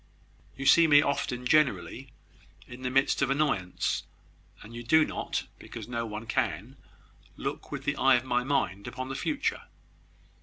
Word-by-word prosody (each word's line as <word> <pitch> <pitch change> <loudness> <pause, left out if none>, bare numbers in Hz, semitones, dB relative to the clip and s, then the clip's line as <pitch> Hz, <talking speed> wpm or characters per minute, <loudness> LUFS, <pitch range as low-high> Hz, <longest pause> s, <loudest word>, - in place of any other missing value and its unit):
You 135 - -5
see 165 +3 +7
me 145 -1 +7
often, 125 -3 -2
generally, 135 -1 +1 0.5
in 125 +1 -11
the 125 - -2
midst 135 +2 +2
of 135 - +2
annoyance, 135 -11 0 0.6
and 110 - -12
you 120 - -6
do 155 +6 +4
not - - -3 0.2
(because - - -9
no 115 -1 -3
one 105 +1 -6
can) 120 0 -2 0.6
look - - -5
with - - -5
the - - -1
eye - - +5
of 120 - 0
my 125 -1 0
mind 125 -8 -1
upon 130 0 -5
the 135 - -4
future. 290 - -1
130 Hz, 160 wpm, -28 LUFS, 120-140 Hz, 0.6 s, see